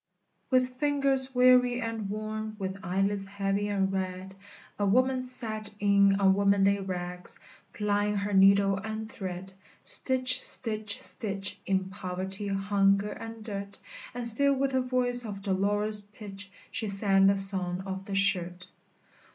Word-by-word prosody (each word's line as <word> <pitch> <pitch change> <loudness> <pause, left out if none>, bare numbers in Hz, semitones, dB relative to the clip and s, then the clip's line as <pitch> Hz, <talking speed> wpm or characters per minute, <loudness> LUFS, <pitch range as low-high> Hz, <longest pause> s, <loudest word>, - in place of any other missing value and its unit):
With 255 -1 +1
fingers 275 -2 +1
weary 250 -1 +4
and 225 -4 -4
worn, 215 +1 -5
With 190 -1 -5
eyelids 195 +2 -1
heavy 200 +1 -2
and 195 -1 -1
red, 190 0 -4 0.5
A 205 - +1
woman 255 +5 +2
sat, 225 -4 -3
in 200 -1 +4
unwomanly 200 0 +3
rags, 180 -2 -6 0.3
Plying 210 -1 -1
her 200 0 -2
needle 195 0 +4
and 220 +2 -5
thread, 190 -1 -7 0.3
Stitch! 255 -1 -1
stitch! 215 -3 +3
stitch! 200 -3 -2
In 190 0 -1
poverty, 190 0 -4
hunger, 195 +1 +1
and 225 +1 -9
dirt; 200 -2 -6 0.4
And 245 -1 -3
still 280 +5 +2
with 270 0 -1
a 260 - +2
voice 250 -1 0
of 200 -3 -7
dolorous 205 +2 +3
pitch 205 -1 -11 0.2
She 225 0 -3
sang 195 -1 +2
the 195 0 +3
"Song 190 -2 +2
of 190 0 -6
the 195 - -5
Shirt!" 180 -2 0
200 Hz, 135 wpm, -28 LUFS, 195-225 Hz, 0.5 s, weary